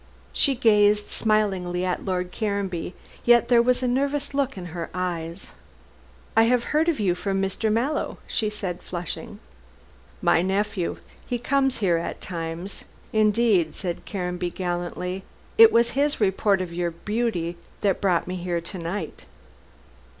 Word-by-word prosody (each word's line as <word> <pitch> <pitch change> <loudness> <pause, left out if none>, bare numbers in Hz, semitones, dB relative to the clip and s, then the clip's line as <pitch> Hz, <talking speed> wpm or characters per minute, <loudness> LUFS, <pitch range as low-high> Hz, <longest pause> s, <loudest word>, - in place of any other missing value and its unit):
She 275 - +3
gazed 210 -3 +4
smilingly 190 -5 +1
at 180 - -1
Lord 180 -2 -2
Caranby, 200 -5 -2 0.3
yet 240 0 +5
there 240 -1 +6
was 250 +1 +2
a - - +2
nervous 280 +3 0
look 275 -4 0
in 180 - -6
her 170 -2 -4
eyes. 175 -1 -4 0.8
"I 225 - +6
have 245 0 +3
heard 315 +3 +3
of 320 - 0
you 190 -4 +2
from 195 +2 -2
Mr. 195 +3 0
Mallow," 255 +8 0
she 215 - -1
said 195 -4 -4
flushing. 175 -2 -5 0.8
"My - - +3
nephew. 195 0 -1 0.3
He 245 - -1
comes 270 +2 +1
here 170 -3 +3
at 165 - -4
times. 170 +2 -5 0.3
Indeed," 215 -6 +3
said 175 -3 -4
Caranby 180 -2 -2
gallantly, 180 +1 -3 0.4
"it 450 -1 +10
was 235 +1 +4
his 285 +3 +1
report 195 -1 +2
of 175 -2 -5
your 175 0 0
beauty 175 -1 -2 0.2
that 195 -3 +1
brought 180 -4 +2
me 185 0 -4
here 175 -1 -1
to 170 +3 -8
night." 170 0 -5
195 Hz, 150 wpm, -25 LUFS, 175-230 Hz, 0.8 s, it